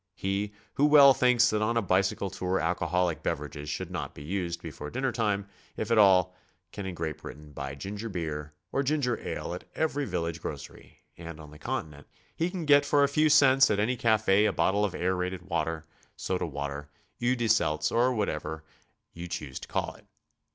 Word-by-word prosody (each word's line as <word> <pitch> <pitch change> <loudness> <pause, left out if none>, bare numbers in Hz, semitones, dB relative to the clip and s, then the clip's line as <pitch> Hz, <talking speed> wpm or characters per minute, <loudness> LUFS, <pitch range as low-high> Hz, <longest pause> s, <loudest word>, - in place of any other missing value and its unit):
Pic 100 +2 -2 0.2
who 145 - +3
well 140 -2 +8
thinks 125 -2 +4
that 105 0 0
on 115 +2 +1
a - - +3
bicycle 95 +1 +1
tour 90 +2 -1
alcoholic 85 -1 0
beverages 75 -2 -4
should - - -4
not - - -5
be 70 - -9
used 85 +1 -3
before 75 -2 -7
dinner 130 - -1
time, 105 -4 -1 0.3
if 110 +1 -3
at 115 - +5
all, 90 -2 +5 0.4
can 100 -2 -6
in 90 - -5
Gr^at 80 -2 -3
Britain 75 0 -10
buy 70 -1 -6
ginger 100 +9 -6
beer 75 -5 -4 0.2
or 135 - +1
ginger 140 -4 0
ale - - -4
at 90 - -7
every 145 -3 0
village 85 -5 -3
grocery, - - -9 0.2
and 85 -2 -8
on 75 -1 -11
the 75 - -14
Continent 75 -2 -5 0.3
he 165 +2 0
can 180 -3 -5
get 145 -1 +6
for 145 0 +3
a - - +5
few 155 +2 +2
cents 135 -3 +6
at 100 - +1
any 115 +5 +1
cafe 110 -3 +3
a - - +3
bot 85 +3 +2
tle 105 +1 +1
of 95 -3 -3
aerated 90 0 -1
water, 80 -1 -2 0.3
soda 90 -2 -2
water, 70 0 -5 0.3
eau 125 +1 +2
de 120 -2 -1
Seitz, 75 -6 +2
or 120 +2 +3
whatever 80 -8 -3 0.5
you 85 +1 -7
choose 70 -6 -5
to - - -10
call - - -2
it. - - -20
95 Hz, 195 wpm, -28 LUFS, 80-120 Hz, 0.5 s, well